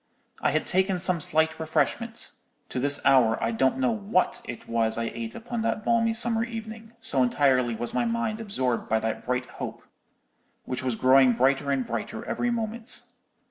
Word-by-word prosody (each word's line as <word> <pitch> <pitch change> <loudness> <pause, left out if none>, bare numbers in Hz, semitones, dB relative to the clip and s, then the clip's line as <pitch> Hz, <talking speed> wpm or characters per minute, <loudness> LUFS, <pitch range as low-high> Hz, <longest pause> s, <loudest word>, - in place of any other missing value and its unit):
I - - +2
had 155 +2 0
taken 190 0 +1
some 180 -2 +1
slight 160 +2 +2
refreshment—to 155 -4 -3
this 145 +2 +4
hour 125 -5 +5
I 115 - 0
don't 130 +4 +1
know 260 -2 +2
what 205 -4 0
it 120 - -8
was 115 -1 +1
I 115 0 -2
ate 115 -1 -6
upon 235 0 -4
that 215 -1 -2
balmy 230 -1 +2
summer 230 -1 +1
evening, 225 -1 -7
so 185 -12 0
entirely 125 -2 +2
was 120 +2 -4
my 240 - +1
mind 230 -1 -1
absorbed 130 - -1
by 110 - +3
that 110 0 -3
bright 125 0 0 0.2
hope, - - -5 0.8
which 125 - -3
was 130 -2 -1
growing 130 +1 +5
brighter 135 +4 +2
and 135 -2 0
brighter 110 -1 -5
every 240 - -1
moment. 230 0 -2
145 Hz, 175 wpm, -26 LUFS, -, 0.8 s, hour